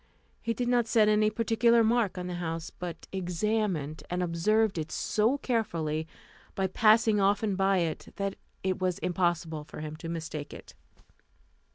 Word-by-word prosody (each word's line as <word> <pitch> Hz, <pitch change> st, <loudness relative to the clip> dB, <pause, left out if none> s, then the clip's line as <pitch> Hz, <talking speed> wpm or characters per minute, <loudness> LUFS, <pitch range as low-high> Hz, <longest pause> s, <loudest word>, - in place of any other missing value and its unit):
He 230 Hz, -1 st, -1 dB
did 245 Hz, -, -1 dB
not 240 Hz, -2 st, +2 dB
set 220 Hz, -1 st, +4 dB
any 215 Hz, 0 st, +4 dB
particular 230 Hz, +1 st, +3 dB
mark 225 Hz, -4 st, +2 dB
on 180 Hz, -, -4 dB
the 180 Hz, -, -4 dB
house, 165 Hz, -1 st, -4 dB
but 175 Hz, -2 st, -7 dB
examined 180 Hz, -4 st, -1 dB
and 180 Hz, +1 st, -1 dB
observed 190 Hz, +4 st, +1 dB
it 155 Hz, 0 st, -5 dB
so 220 Hz, -, +1 dB
carefully, 165 Hz, -, -1 dB, 0.5 s
by 195 Hz, -, 0 dB
passing 215 Hz, +2 st, +4 dB
often 200 Hz, +1 st, +2 dB
by 195 Hz, 0 st, +2 dB
it, 165 Hz, -3 st, -2 dB
that 200 Hz, -1 st, -2 dB, 0.3 s
it 190 Hz, 0 st, -1 dB
was 185 Hz, -2 st, 0 dB
impossible 175 Hz, -3 st, -1 dB
for 150 Hz, -, -9 dB
him 155 Hz, 0 st, -5 dB
to 165 Hz, +1 st, -7 dB
mistake 160 Hz, -3 st, -5 dB
it. -, -, -12 dB
190 Hz, 160 wpm, -29 LUFS, 165-220 Hz, 0.5 s, set